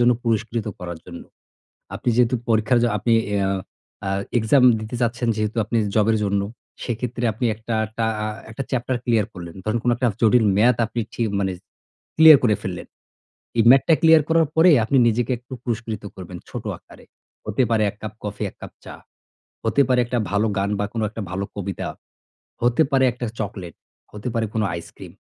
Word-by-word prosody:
জন্য 120 0 +5
পুরস্কৃত 115 0 -1
করার 85 -2 -6
জন্য। 85 -1 -9 0.7
আপনি - - -3
যেহেতু 125 0 +3
পরীক্ষার 115 +2 +3
জ - - +4
আপনি 115 +4 0 0.2
এ - - +2
অ্যা 95 - +1 0.6
আ - - -1 0.3
এক্সাম 120 +4 +3 0.2
দিতে 110 +3 -7
চাচ্ছেন 120 0 0
যেহেতু 110 +1 -2
আপনি 110 +3 -2 0.2
জব 105 -1 +3
এর - - +2
জন্য। 100 0 +1 0.4
সেক্ষেত্রে 120 0 -3
আপনি 115 +4 -4
একটা 110 +2 -5
একটা 110 +2 -3 0.2
আ - - -1 0.2
একটা 115 +5 -5
চ্যাপ্টার 125 0 -1
ক্লিয়ার 115 -4 +2
করলেন। 85 -3 -9
ধরুন 110 +2 0
কোনো 120 - +2
একটা 125 0 +1
জটিল 115 +1 +4
ম্যাথ 115 +3 +4
আপনি 115 +1 -4
ঠি - - -3 0.2
মানে 95 -1 0 0.6
ক্লিয়ার 155 -2 +9
করে 110 -4 +3
ফেললেন। 90 -4 -5 0.7
এই 115 - +5
ম্যাথ 135 +1 +8
টা 165 - +6
ক্লিয়ার 160 -1 +7
করার 165 -1 +3
পরে 165 +3 +6 0.2
আপনি 135 - +2
নিজেকে 120 +2 0
একটু 125 +2 -12
পুরস্কৃত 115 -3 -4
করবেন 90 -1 -8
ছোট - - -6
আকারে। - - -18 0.4
হতে 130 - +1
পারে 110 -2 +2
এক 100 - -10
কাপ 110 0 -6
কফি, 105 -2 -4
এক - - -21
কাপ - - -8
চা। - - -8 0.7
হতে 115 +5 +3
পারে 125 -1 +3
একটা 120 +1 -2
ভালো 100 +2 +2
গান, 100 +1 0
বা 105 - 0
কোন 115 - -2
একটা 110 +1 -7
ভালো 95 +1 -2
কবিতা। 100 -2 -4 0.7
হতে 120 +5 +3
পারে 135 -1 +4
একটা 120 +1 -5
চকোলেট, 95 -5 -5 0.4
হতে 105 +3 -7
পারে 115 -1 0
কোন 110 - 0
আইসক্রিম। 85 - -10
115 Hz, 190 wpm, -22 LUFS, 105-125 Hz, 0.7 s, ক্লিয়ার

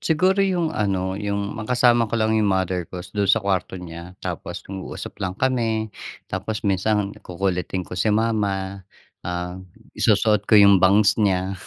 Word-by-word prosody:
Siguro 185 +5 +2
yung 180 -4 +1
ano 95 -3 -1
yung 100 0 -3
makasama 120 0 +2
ko 115 - -1
lang 110 0 +1
yung 110 -2 +2
mother 95 -2 -1
ko 90 -1 -7
dun 100 -2 0
sa - - +5
kwarto 95 -1 -1
niya, 85 +1 -9
tapos - - -5
nag-uusap 95 -1 -7
lang 95 0 -3
kami. 115 -5 0 0.3
Tapos 105 +3 -4
minsan 100 +1 +1
kukulitin 90 0 -2
ko - - -13
si 95 +4 0
mama, 100 -3 0 0.4
ah, 90 +1 -4 0.3
isusuot 105 -1 +2
ko 110 - +6
yung 100 -2 +7
bangs 100 +3 +4
niya. 95 -1 +1
100 Hz, 155 wpm, -22 LUFS, 95-110 Hz, 0.4 s, yung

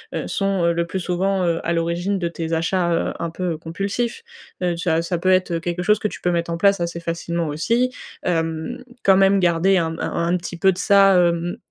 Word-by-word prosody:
heu, - - -3
sont, 195 -2 0
heu, 170 - +3
le 170 0 -1
plus 190 - -3
souvent, 185 +1 0
heu, 165 -1 +1
à 170 - 0
l'origine 170 +4 -1
de 175 -2 -1
tes 165 -1 -4
achats, 170 +2 0
heu, 165 - 0
un 170 - -2
peu 175 0 -3
compulsifs, 200 - -3 0.4
heu, 175 -1 +1
ça 165 -1 0
ça 175 0 -2
peut 185 - +1
être, 185 -1 +3
heu, 165 - 0
quelque 175 +1 -3
chose 210 +3 +3
que 215 - 0
tu - - -8
peux 180 - 0
mettre 170 -1 -1
en 170 - -2
place 200 +2 +3
assez 170 0 -3
facilement 170 -1 -3
aussi, 230 +12 0 0.3
hem, 165 +4 -2 0.2
quand 195 - +6
même 195 +1 +4
garder 180 +2 +3
un 165 -2 +1
m 165 - -7
un - - -2 0.2
un - - +3
petit 175 0 -7
peu 190 +3 +4
de 180 - -6
ça, 195 -1 +5
hem, 175 +2 +1
175 Hz, 235 wpm, -21 LUFS, 170-195 Hz, 0.4 s, quand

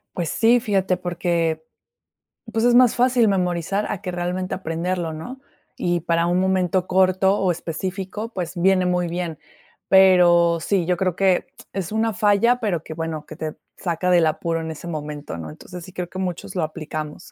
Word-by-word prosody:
Pues 170 -3 -2
sí, 235 +2 +4
fíjate, 195 -5 0
porque, 170 -3 -1 0.9
pues, 225 +1 +1
es 245 0 +5
más 250 -2 +6
fácil 245 -2 +3
memorizar 185 +1 0
a 205 - -4
que 180 - -4
realmente 180 +1 -2
aprenderlo, 170 -1 -3
¿no? 245 +13 -8 0.4
Y 175 -1 0
para 170 0 +1
un 175 +1 +2
momento 185 -1 +1
corto, 190 +1 +3
o 185 -2 +2
específico, 190 +6 -5
pues, 175 -2 -4
viene 185 +1 +3
muy 180 -1 +1
bien. 170 -2 -4 0.5
Pero 175 -3 +5
sí, 180 +1 0
yo 180 +1 +1
creo 185 -2 0
que 190 -2 +2 0.3
es 190 -2 -4
una 220 +1 0
falla, 210 +5 +3
pero 185 -9 -1
que, - - -7
bueno, 160 -1 -4
que 155 - -10
te 155 -1 -4 0.2
saca 180 +1 -1
del 175 -2 +5
apuro 165 +1 -1
en 160 0 -4
ese 160 +2 -9
momento, 150 - -5
¿no? 80 -1 -7
Entonces, 180 - -10
sí 185 - -13
creo 180 -1 -4
que 185 - -7
muchos 180 -1 -4
lo 180 - 0
aplicamos. 155 -1 -6
180 Hz, 180 wpm, -22 LUFS, 165-190 Hz, 0.9 s, más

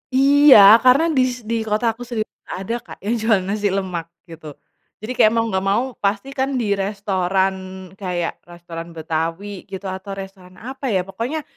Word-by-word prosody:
Iya 280 +1 +7 0.3
karena 255 +5 +5
dis 250 -2 +1
di 230 - 0
kota 215 +3 0
aku 240 +2 -10
sendiri 225 -3 -3 0.2
gak - - -5
ada 230 +5 -3
Kak - - -11
yang 220 +4 0
jual 220 -2 +3
nasi 205 +2 -1
lemak 185 -4 -3 0.2
gitu, 160 -4 -11 0.5
jadi 235 - -4
kayak 215 - +5
mau 230 - +2
gak 190 0 -1
mau 205 +5 +2 0.2
pasti 200 +7 -1
kan 270 0 -1
di 225 -5 -1
restoran 195 -1 0 0.4
kayak 180 -3 -3
restoran 170 -1 -9
Betawi 165 +5 -4
gitu 190 0 -8
atau 190 +1 -7
restoran 190 -2 -10
apa 265 +5 -7
ya 190 -5 +1
pokoknya, 235 - -4
200 Hz, 170 wpm, -20 LUFS, 185-235 Hz, 0.5 s, Iya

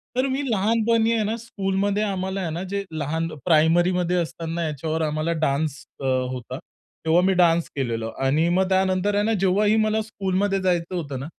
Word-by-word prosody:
तर 255 +2 +1
मी 270 +1 -1
लहानपणी 225 +2 +2
आहे 220 -2 +1
ना, 215 +2 -1
स्कूलमध्ये 200 -2 -1
आम्हाला 190 -1 -2
आहे 175 - -2
ना, 170 +4 -4
जे 200 0 -2
लहान 160 +1 -2 0.2
प्रायमरीमध्ये 175 +2 +3
असताना, 165 0 -3
याच्यावर 155 +2 -3
आम्हाला 155 +2 -1
डान्स 140 0 -1 0.2
अ, - - -8 0.3
होता. 125 +2 -6 0.5
तेव्हा 165 +2 +4
मी 190 - +3
डान्स 170 -2 +3
केलेला. 115 -5 -2 0.2
आणि 150 +5 +2
मग 190 0 +2
त्यानंतर 190 +1 +1
आहे 205 - +2
ना, 225 - +1
जेव्हाही 200 +3 +3
मला 215 0 +1
स्कूलमध्ये 195 -2 -1
जायचं 180 -1 0
होतं 140 -6 -4
ना, 135 - -5
180 Hz, 175 wpm, -23 LUFS, 160-200 Hz, 0.5 s, तेव्हा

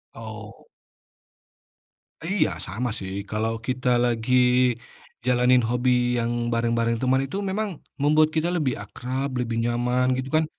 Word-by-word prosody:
Oh. - - -10 1.6
Iya, 195 - +2 0.2
sama 115 +7 -3
sih. 95 0 -6 0.2
Kalau, 110 +1 -1
kita 125 -1 0 0.2
lagi 120 +1 0 0.9
jalanin 125 0 +4
hobi 125 +1 +1 0.3
yang 115 0 -1 0.2
bareng-bareng 115 0 +1
teman, 130 +1 +2
itu 140 +8 -5
memang 210 +2 -1 0.3
membuat 155 +1 +4
kita 160 +1 +1
lebih 145 -7 +1
akrab, 130 +6 -4
lebih 115 -2 -2
nyaman, 120 +2 +1
gitu 130 0 -4
kan? 155 0 +3
125 Hz, 125 wpm, -24 LUFS, 115-135 Hz, 1.6 s, jalanin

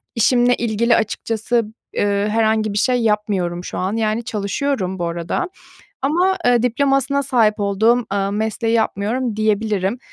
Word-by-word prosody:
işimle 245 +1 +3
ilgili 235 +1 +1
açıkçası, 225 +2 -1 0.3
eee, 205 0 0
herhangi 220 -1 +1
bir - - -2
şey 250 +3 +2
yapmıyorum 205 -5 -1
şu - - -6
an, 185 +2 -1
yani 220 +1 0
çalışıyorum 205 -2 -2
bu 175 - -1
arada. 170 - -3 0.5
Ama, 355 +7 +2
eee, 245 -1 +4
diplomasına 275 +2 +1
sahip 235 -6 +2
olduğum, 220 +4 +2
ııı, 200 0 0
mesleği 220 +2 -1
yapmıyorum 225 +2 -1
diyebilirim. 215 0 0
220 Hz, 135 wpm, -19 LUFS, 205-245 Hz, 0.5 s, eee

